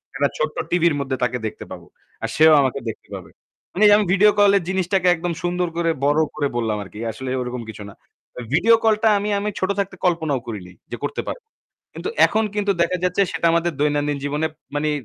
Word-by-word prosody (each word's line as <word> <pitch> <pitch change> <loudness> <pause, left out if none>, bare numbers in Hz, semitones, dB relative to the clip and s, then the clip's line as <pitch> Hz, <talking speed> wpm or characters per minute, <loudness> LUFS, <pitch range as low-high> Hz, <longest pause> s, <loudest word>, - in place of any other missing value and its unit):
একটা 145 0 +2
ছোট্ট 155 0 -2
টিভির 170 -3 +2
মধ্যে 135 -1 -2
তাকে 125 0 0
দেখতে 110 - -5
পাবো। - - -9 0.4
আর - - -2
সেও 155 0 +6
আমাকে 135 0 0
দেখতে - - -9
পাবে। - - -10 0.4
মানে 210 +4 +3
আমি 210 - +1
ভিডিও 210 +2 +5
কলের 200 -2 +4
জিনিসটাকে 190 0 0
একদম 170 +1 -3
সুন্দর 175 0 0
করে 170 -1 +1 0.2
বড় 145 +2 +3 0.2
করে 145 -2 0
বললাম 110 -3 -1
আরকি। 100 +2 -12
আসলে 130 +4 -7
ওইরকম 125 0 -4
কিছু 105 -1 -8
না। - - -12 0.4
তো - - -8
ভিডিও 220 +9 +5
কলটা 220 0 +3
আমি 205 - -3
আমি 210 +1 -2
ছোট 185 - -1
থাকতে 195 -1 -2
কল্পনাও 160 -6 +1
করিনি, 100 -6 -7 0.2
যে - - -4
করতে - - -3
পারবো। 475 -3 -7 0.5
কিন্তু - - -5 0.2
এখন 220 - +1
কিন্তু 205 -1 +1
দেখা 180 +2 +1
যাচ্ছে 180 +2 +1
সেটা - - -2
আমাদের 170 +1 +1
দৈনন্দিন 145 0 0
জীবনে 150 +2 -1 0.3
মানে 150 +1 0
165 Hz, 200 wpm, -21 LUFS, 140-190 Hz, 0.5 s, সেও